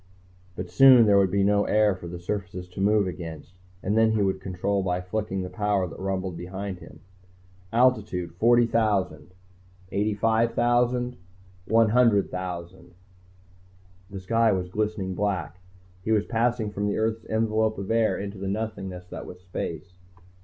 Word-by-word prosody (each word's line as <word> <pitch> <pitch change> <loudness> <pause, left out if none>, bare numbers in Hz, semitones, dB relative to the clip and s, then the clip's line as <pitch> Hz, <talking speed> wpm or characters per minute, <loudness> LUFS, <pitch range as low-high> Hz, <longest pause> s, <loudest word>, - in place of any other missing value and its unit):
But 90 -1 -6
soon 130 +2 +8
there 100 -2 +5
would 95 -1 +3
be 100 +1 +1
no 100 +1 +3
air 105 -1 +3
for 90 -2 -9
the 90 +1 -6
surfaces 90 0 -5
to 90 - -7
move 105 0 +3
against, 80 -2 -7 0.3
and 100 +3 0
then 110 0 +4
he 105 -2 +1
would 95 -1 -1
control 95 +2 -1
by 90 -1 -1
flicking 95 +1 -3
the 90 - -5
power 105 -3 0
that - - -10
rumbled 95 -1 -3
behind 95 +2 -6
him. - - -14 0.7
"Altitude 110 -8 +1
40,000... 110 -7 +2 0.3
"... 95 0 -28
85,000... 120 +4 +1 0.2
"... 90 0 -28
100,000...." 95 -6 +1 1.2
The 95 - -7
sky 115 +4 +2
was 90 -2 -2
glistening 105 -1 -2
black, 90 -4 -2 0.4
he 110 - -2
was 105 -1 +2
passing 115 -2 0
from 100 0 -2
the 100 - -1
earth's 110 0 -1
envelope 110 0 +1
of 100 +2 -4
air 115 -1 +2
into 100 0 -6
the 95 - -4
nothingness 95 -3 -4
that - - -8
was 90 - -10
space. 90 -2 -6
100 Hz, 155 wpm, -26 LUFS, 90-110 Hz, 1.2 s, soon